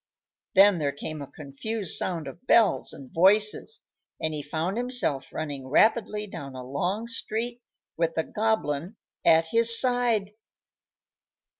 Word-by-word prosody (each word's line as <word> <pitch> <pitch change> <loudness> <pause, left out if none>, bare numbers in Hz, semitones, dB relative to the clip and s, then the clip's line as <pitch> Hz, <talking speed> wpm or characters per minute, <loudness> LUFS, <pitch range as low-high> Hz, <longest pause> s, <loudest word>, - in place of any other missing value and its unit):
Then 195 -1 +6
there 145 -2 -1
came 150 +2 -7
a 140 - -7
confused 170 +8 -5
sound 165 -5 -3
of 135 - -12
bells 225 -3 +3
and 135 -2 -11
voices, 210 - +2 0.4
and 160 0 -2
he 150 - -3
found 160 +6 -3
himself 245 - -1
running 145 -4 -6
rapidly 210 - +2
down 140 -9 -9
a 130 - -7
long 175 - -3
street 235 +1 -4 0.4
with 165 0 -1
the 160 - 0
Goblin 205 -5 -2 0.3
at 165 0 +4
his 230 +2 +7
side. 245 -5 +1
185 Hz, 135 wpm, -26 LUFS, 150-225 Hz, 0.4 s, his